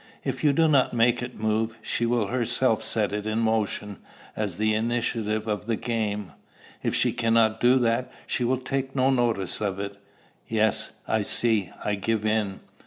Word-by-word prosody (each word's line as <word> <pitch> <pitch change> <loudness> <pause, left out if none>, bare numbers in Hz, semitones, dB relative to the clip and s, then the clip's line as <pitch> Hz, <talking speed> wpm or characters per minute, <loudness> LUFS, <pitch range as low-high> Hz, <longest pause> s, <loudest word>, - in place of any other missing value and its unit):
If - - -3
you 150 - +5
do 160 +3 +3
not 140 -5 +3
make 120 +1 +3
it 125 0 -6
move, 110 +1 0
she 120 +1 0
will 120 -2 +1
herself 120 +1 +1
set 105 -3 0
it 105 0 -3
in 110 0 -1
motion 110 -3 -1 0.4
as 105 -5 -2
the 110 +1 +2
initiative 110 -1 -1
of 105 0 -2
the 115 - +1
game. 105 -4 -2 0.5
If - - -1
she - - +2
cannot 115 -2 +2
do 125 +2 +5
that, 120 0 +1
she 125 - -1
will 130 +2 +2
take 135 +1 -3
no 130 0 +3
notice 115 -8 0
of 100 -2 -1
it." 100 0 -5 0.5
"Yes, 110 -1 +1
I 110 - +1
see. 105 -2 +1
I 105 - +1
give 110 +2 -1
in." 105 -3 0
110 Hz, 175 wpm, -26 LUFS, 105-120 Hz, 0.5 s, you